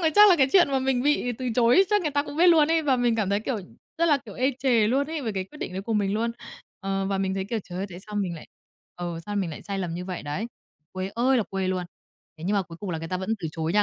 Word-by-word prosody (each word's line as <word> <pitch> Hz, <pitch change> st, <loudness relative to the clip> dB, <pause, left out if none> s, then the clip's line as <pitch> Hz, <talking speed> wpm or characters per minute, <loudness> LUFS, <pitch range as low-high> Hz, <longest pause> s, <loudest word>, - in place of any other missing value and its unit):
rồi 320 Hz, -2 st, +3 dB
chắc 415 Hz, 0 st, +9 dB
là 350 Hz, -, +6 dB
cái 270 Hz, -2 st, +4 dB
chuyện 355 Hz, -6 st, +6 dB
mà 270 Hz, -, +2 dB
mình 260 Hz, -1 st, +1 dB
bị 285 Hz, -4 st, +1 dB
từ 255 Hz, -1 st, -2 dB
chối 245 Hz, -, +5 dB
chắc 415 Hz, -2 st, +3 dB
người 305 Hz, -, 0 dB
ta 285 Hz, 0 st, +1 dB
cũng 290 Hz, 0 st, -8 dB
biết 350 Hz, +2 st, +5 dB
luôn 320 Hz, -3 st, +6 dB
ấy, 325 Hz, 0 st, +2 dB
và 275 Hz, -4 st, +2 dB
mình 240 Hz, -2 st, +2 dB
cảm 205 Hz, -3 st, 0 dB
thấy, 200 Hz, +1 st, +1 dB
kiểu, 240 Hz, +1 st, -2 dB, 0.4 s
rất 335 Hz, -, +3 dB
là, 295 Hz, -, +5 dB
kiểu, 205 Hz, -, -9 dB
ê 260 Hz, +2 st, +2 dB
chề 240 Hz, -6 st, +3 dB
luôn 275 Hz, +4 st, +1 dB
ấy 320 Hz, -1 st, -3 dB
về 225 Hz, -4 st, -2 dB
cái 190 Hz, -1 st, -2 dB
quyết 300 Hz, +10 st, -15 dB
định -, -, -5 dB
đấy 190 Hz, +1 st, -4 dB
của 225 Hz, -, -3 dB
mình 205 Hz, -2 st, +1 dB
luôn. 230 Hz, +2 st, 0 dB, 0.5 s
Ờ, 195 Hz, -1 st, -1 dB
và 195 Hz, -1 st, -1 dB
mình 190 Hz, 0 st, 0 dB
thấy, 190 Hz, -, -2 dB
kiểu, 225 Hz, +3 st, -2 dB
trời 180 Hz, 0 st, -7 dB
ơi, 195 Hz, -, -2 dB
tại 175 Hz, -, -8 dB
sao 210 Hz, -, -8 dB
mình 190 Hz, -4 st, -1 dB
lại, 155 Hz, -, -10 dB, 0.5 s
ừ, 175 Hz, -1 st, -4 dB
sao 205 Hz, 0 st, -3 dB
mình 185 Hz, -4 st, -1 dB
lại 150 Hz, -, -8 dB
sai 200 Hz, -1 st, -4 dB
lầm 175 Hz, -3 st, -3 dB
như 180 Hz, +1 st, -5 dB
vậy 180 Hz, -1 st, -5 dB
đấy. 150 Hz, +10 st, -3 dB, 0.5 s
Quê 185 Hz, +1 st, -4 dB
ơi 255 Hz, +3 st, +3 dB
là 230 Hz, -, +3 dB
quê 190 Hz, -1 st, -1 dB
luôn! 185 Hz, -1 st, -1 dB, 0.5 s
Thế 160 Hz, -, -8 dB
nhưng 200 Hz, +4 st, +1 dB
mà 200 Hz, -, +2 dB
cuối 165 Hz, -1 st, -11 dB
cùng 200 Hz, -3 st, -4 dB
là 165 Hz, -, -2 dB
người 165 Hz, 0 st, -6 dB
ta 185 Hz, -, -1 dB
vẫn 190 Hz, +4 st, -4 dB
từ 165 Hz, -, -3 dB
chối 160 Hz, 0 st, -2 dB
nha, 210 Hz, +1 st, +4 dB
210 Hz, 320 wpm, -26 LUFS, 190-265 Hz, 0.5 s, chắc